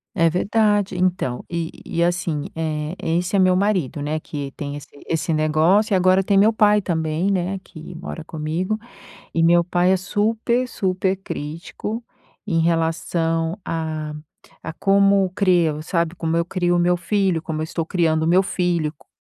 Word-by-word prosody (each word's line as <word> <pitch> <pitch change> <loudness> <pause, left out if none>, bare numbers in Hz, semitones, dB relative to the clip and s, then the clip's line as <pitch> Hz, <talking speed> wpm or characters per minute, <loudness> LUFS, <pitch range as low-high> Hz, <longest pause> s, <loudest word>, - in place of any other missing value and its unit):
É 165 -2 +4
verdade, 205 +2 +1
então, 180 -9 -1
e 170 -1 -2 0.2
e 170 - 0
assim, 170 -4 -1
eh, 155 +1 -3
esse 175 +4 -1
é - - +4
meu 185 -1 +4
marido, 185 -8 0
né, 155 +2 -2
que 145 -3 -6
tem 145 -1 -4
esse 145 - -9 0.2
esse 165 +1 -1
negócio 155 +7 +3
e - - +5
agora 185 +1 +4
tem 200 +1 +1
meu 210 +3 +6
pai 210 -1 +4
também, 160 +1 -1
né, 190 0 -1
que 160 +1 -11
mora 165 -1 -7
comigo 165 +7 -2 0.6
e 165 - +1
meu 170 +1 +5
pai 180 +1 +2
é 190 - +2
super, 225 +5 0
super 190 -3 0
crítico 190 +7 -6 0.4
em 165 -5 0
relação 165 +1 0
a 155 -2 -3 0.5
a 165 - -6
como 195 0 +3
crio, 175 -6 +2
sabe? 170 0 -1
Como 165 -1 -1
eu 170 - +1
crio 175 -1 0
o - - +2
meu 175 +1 +3
filho, 185 -2 0
como 155 -2 -4
eu - - 0
estou 160 0 -3
criando 160 -3 +1
o - - +1
meu 180 +3 +4
filho, 175 -5 -1
co - - -24
175 Hz, 170 wpm, -21 LUFS, 160-190 Hz, 0.6 s, meu